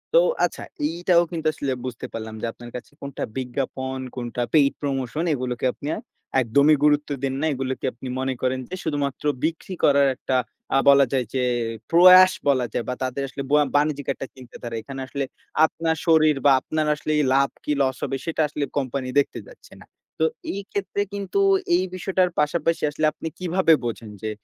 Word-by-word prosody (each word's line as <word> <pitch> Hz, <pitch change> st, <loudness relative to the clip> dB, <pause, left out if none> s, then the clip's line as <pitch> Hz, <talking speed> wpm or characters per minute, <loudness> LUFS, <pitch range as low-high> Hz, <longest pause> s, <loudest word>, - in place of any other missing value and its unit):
তো -, -, +9 dB, 0.3 s
আচ্ছা। -, -, -5 dB, 0.3 s
এইটাও 170 Hz, +2 st, +3 dB
কিন্তু 160 Hz, -2 st, -2 dB
আসলে 140 Hz, -3 st, -3 dB
বুঝতে 125 Hz, -3 st, -5 dB
পারলাম 110 Hz, -1 st, -6 dB
যে -, -, -2 dB
আপনার 120 Hz, 0 st, -11 dB
কাছে 125 Hz, -, -8 dB
কোনটা 140 Hz, -1 st, -5 dB
বিজ্ঞাপন, 130 Hz, +1 st, -3 dB, 0.2 s
কোনটা 120 Hz, -1 st, -3 dB
পেইড 140 Hz, -3 st, +5 dB
প্রমোশন 135 Hz, +1 st, -2 dB
এগুলোকে 125 Hz, -2 st, -3 dB
আপনি 145 Hz, -, -8 dB
আ -, -, -5 dB, 0.4 s
একদমই 140 Hz, +6 st, +4 dB
গুরুত্ব 150 Hz, 0 st, +3 dB
দেন 135 Hz, -1 st, 0 dB
না। -, -, +1 dB
এগুলোকে 130 Hz, 0 st, -3 dB
আপনি 125 Hz, +3 st, -9 dB
মনে 130 Hz, 0 st, -1 dB
করেন 130 Hz, 0 st, 0 dB
যে 185 Hz, -, -4 dB
শুধুমাত্র 145 Hz, -3 st, -2 dB, 0.2 s
বিক্রি 165 Hz, +4 st, -2 dB
করার 140 Hz, -1 st, +5 dB
একটা 130 Hz, -, -2 dB, 0.4 s
আ -, -, +5 dB
বলা 140 Hz, 0 st, +7 dB
যায় 130 Hz, -2 st, +1 dB
যে 130 Hz, -1 st, 0 dB, 0.5 s
প্রয়াস 185 Hz, +2 st, +9 dB, 0.2 s
বলা 130 Hz, -3 st, +3 dB
যায় 120 Hz, -, -1 dB
বা -, -, 0 dB
তাদের 130 Hz, +2 st, -2 dB
আসলে 140 Hz, +1 st, -6 dB
বয়া 150 Hz, 0 st, +5 dB
বাণিজ্যিক 145 Hz, -1 st, +1 dB
একটা 135 Hz, -, -7 dB
চিন্তা 130 Hz, -2 st, -14 dB
ধারা। 120 Hz, -1 st, -5 dB
এখানে 135 Hz, +3 st, -8 dB
আসলে 140 Hz, +2 st, -3 dB, 0.4 s
আপনার 160 Hz, 0 st, -1 dB
শরীর 155 Hz, -2 st, +5 dB
বা 140 Hz, -, +7 dB
আপনার 155 Hz, +3 st, -2 dB
আসলে 150 Hz, -, -4 dB, 0.2 s
লাভ 140 Hz, 0 st, +3 dB
কি -, -, -2 dB
লস 130 Hz, -1 st, +1 dB
হবে 135 Hz, -, -1 dB
সেটা 165 Hz, -1 st, -1 dB
আসলে 150 Hz, 0 st, -3 dB
কোম্পানি 135 Hz, -1 st, -2 dB
দেখতে 140 Hz, -, -1 dB
যাচ্ছে -, -, -16 dB
না। -, -, -16 dB, 0.4 s
তো -, -, +5 dB, 0.3 s
এই 200 Hz, -, -4 dB
ক্ষেত্রে 200 Hz, 0 st, -2 dB
কিন্তু 200 Hz, -, -2 dB, 0.4 s
এই 180 Hz, -, +2 dB
বিষয়টার 185 Hz, 0 st, +1 dB
পাশাপাশি 165 Hz, +2 st, +1 dB
আসলে 155 Hz, +1 st, -1 dB
আপনি -, -, -6 dB
কিভাবে 180 Hz, -1 st, +3 dB
বোঝেন 115 Hz, -1 st, -4 dB
যে 110 Hz, -, -3 dB
140 Hz, 185 wpm, -23 LUFS, 130-160 Hz, 0.5 s, তো